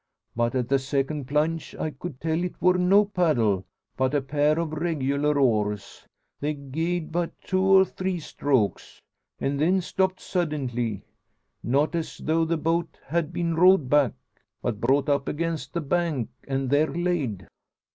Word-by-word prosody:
But 120 +1 0
at 125 -2 0
the 135 +1 +2
second 135 +1 -2
plunge 155 +3 -1
I 155 - -3
could 145 -2 -8
tell 160 +2 -1
it 180 - -5
wor 180 +2 +4
no 185 +3 +4
paddle, 125 - +1 0.3
but 130 +2 0
a 145 - +2
pair 150 +2 +2
of 165 -2 -1
regular 150 -2 0
oars. 105 -6 0 0.3
They 150 +1 -1
gied 160 +5 -3
but 170 0 -2
two 185 0 0
or 190 0 +6
three 185 -1 -3
strokes, 135 -8 -1 0.4
an' 140 +1 -1
then 175 +6 +3
stopped 185 +1 0
suddintly; 130 - -2 0.6
not 140 +7 +1
as 165 -1 -3
though 165 +1 +1
the 165 +1 0
boat 165 +2 -1
had 165 +2 -1
been 170 -1 -1
rowed 175 -4 +5
back, 145 -5 +4 0.5
but 110 -4 -2
brought 135 +4 +2
up 140 -1 +1
against 160 -3 -2
the 170 - -2
bank, 150 -6 -1 0.2
an' 135 -1 -1
there 145 +3 +3
layed." 155 - -2
150 Hz, 155 wpm, -25 LUFS, 135-170 Hz, 0.6 s, or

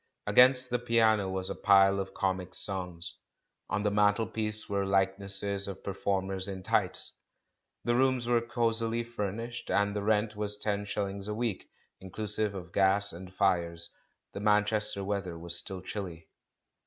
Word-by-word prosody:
Against 125 0 +6
the 125 - +1
piano 110 -4 +3
was 95 0 -3
a - - -4
pile 100 -1 +5
of 95 0 -5
comic 95 -2 -2
songs; 90 -3 -1 0.5
on 105 -1 -1
the 105 - +1
mantelpiece 105 +1 +1
there 100 - -3
were 100 - 0
likenesses 100 +1 0
of 95 -1 -7
per 100 - -3
formers 95 -1 -1
in 95 -1 -6
tights. - - 0 0.7
The 120 - +1
rooms 130 -1 +2
were 120 -1 +3
cosily 115 0 0
fur 110 -4 -3
nished, 115 +3 -7
and 100 0 +1
the 105 - -1
rent 105 +1 +1
was 105 0 +1
ten 105 -1 -2
shillings 100 -1 -3
a 105 - -3
week 115 -4 -3 0.3
in 95 - -10
clusive 105 +1 -1
of 90 -2 -8
gas 100 0 +3
and 90 +2 -9
fires; 85 -3 0 0.4
the - - -5
^Manchester 105 -1 +1
weather 95 -4 -3
was 85 +1 -5
still 95 -1 -6
chilly. 85 -5 -6
100 Hz, 165 wpm, -30 LUFS, 95-110 Hz, 0.7 s, Against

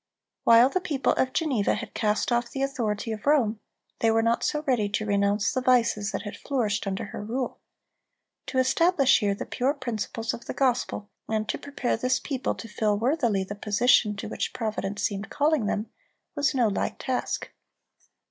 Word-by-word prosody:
While 230 +2 +7
the 370 - -1
people 285 -7 +1
of 260 - +1
Geneva 265 -11 +1
had - - -7
cast 210 +2 0
off 240 0 +1
the 270 - -3
authority 225 -5 -2
of 215 +4 -6
Rome, 235 -8 +3 0.4
they 225 - +3
were 225 0 +3
not 230 +1 +2
so 300 0 0
ready 240 -7 +1
to 215 +1 -1
renounce 200 0 +1
the 255 - -1
vices 235 -5 +2
that 195 - -4
had 205 - -6
flourished 220 -8 -1
under 190 +1 -2
her - - -5
rule. 245 +4 -3 0.9
To 260 - -3
establish 275 +2 +4
here 205 -3 +1
the - - -5
pure 270 +4 0
principles 230 -3 -3
of - - -8
the - - -5
gospel, 245 -5 0 0.2
and 215 -1 -1
to - - -1
prepare 280 -4 -2
this 255 +3 +1
people 270 -3 -2
to 225 - -8
fill 210 -1 0
worthily 235 -5 +1
the 190 - -6
position 210 +1 +3
to 200 - -6
which - - -3
Providence 210 -3 -3
seemed 200 -1 -2
calling 290 -6 +1
them, 210 +2 -2 0.4
was 290 0 +1
no 245 -3 +3
light 200 - -2
task. 255 -1 -3
230 Hz, 185 wpm, -26 LUFS, 210-260 Hz, 0.9 s, While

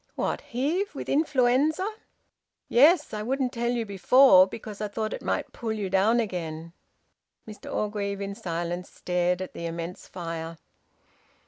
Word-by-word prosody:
"What? - - -2
Heve? 320 - -2
With - - -6
influenza?" 295 +4 +2 0.8
"Yes. 295 +5 +5
I 210 - -3
wouldn't 260 +3 -1
tell 235 0 -1
you 240 -2 -1
before 200 0 +6
because 210 +1 -8
I 210 - -1
thought 215 +1 -3
it - - -6
might - - -2
pull 225 -2 -4
you 205 -4 -3
down 205 +5 +3
again." 170 -6 -4 0.7
Mr 210 -1 -9
Orgreave, 205 -1 -2
in 200 0 -4
silence, 175 -1 -4
stared 180 0 -1
at 185 - -9
the 170 - -5
immense 170 +2 -6
fire. 165 -2 -6
210 Hz, 145 wpm, -26 LUFS, 180-245 Hz, 0.8 s, before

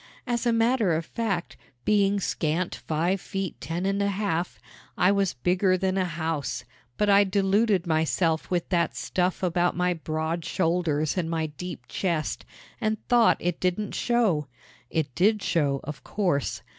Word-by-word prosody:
As 240 -1 -1
a - - +4
matter 230 -4 +2
of 160 +1 -1
fact, 200 -6 -3 0.3
being 200 -1 +3
scant 170 -1 -1
five 170 +5 0
feet 195 -3 -4
ten 170 +3 -3
and 195 +1 +1
a 200 - +2
half, 190 -4 -1 0.4
I 180 +2 +4
was 200 -5 +1
bigger 185 +8 +2
than 190 0 0
a 190 -1 +1
house; 160 -7 -3 0.3
but 210 - +2
I 200 0 +6
deluded 200 0 +2
myself 160 0 +1
with 175 -2 -1
that 170 -2 +1
stuff 180 +1 -1
about 175 -1 +1
my 180 0 +2
broad 160 +1 -3
shoulders 165 -3 0
and 165 -2 -2
my 165 -1 0
deep 155 +4 -7
chest, 170 -5 -2 0.3
and 215 0 0
thought 240 -2 +5
it 175 -1 -2
didn't 185 +3 -1
show. 215 - +1 0.4
It 155 -5 -1
did 205 - +2
show, 140 -5 +1
of 150 0 -7
course. 175 -9 -1
180 Hz, 155 wpm, -26 LUFS, 160-200 Hz, 0.4 s, I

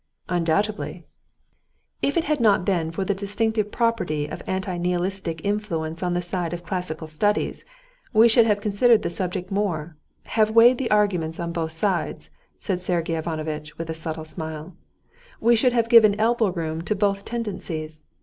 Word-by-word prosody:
"Undoubtedly." 180 +5 -1 1.0
"If 285 - 0
it 335 - +2
had 305 -1 0
not 205 -5 +3
been 170 -5 0
for 180 +4 -3
the 200 - +1
distinctive 210 +2 0
property 230 -11 0
of 150 - -7
anti 190 -1 -2
nihilistic 180 -1 -2
influence 170 -6 -2
on 180 -1 0
the 175 - 0
side 175 -1 -3
of 175 0 -6
classical 180 -3 -3
studies, 205 +7 -1 0.5
we 225 0 +6
should 230 0 +5
have 205 -1 +2
considered 215 +3 +3
the - - -2
subject 185 +1 -3
more, 175 -6 -2 0.3
have 215 -1 +1
weighed 230 +3 +6
the 260 - -1
arguments 180 -7 +1
on 170 0 -3
both 165 -1 -3
sides," 180 +2 -2 0.3
said 185 -3 -1
Sergey 170 -2 -1
Ivanovitch 155 -2 -4
with 165 0 -4
a - - -2
subtle 160 0 -5
smile, 160 +1 -7 0.6
"we 235 +1 +4
should 245 +2 +3
have 230 -2 +2
given 220 -3 +6
elbow 225 -1 +3
room 165 -3 -3
to 210 +5 -1
both 200 0 0
tendencies. 170 -10 -5
185 Hz, 165 wpm, -24 LUFS, 165-215 Hz, 1.0 s, we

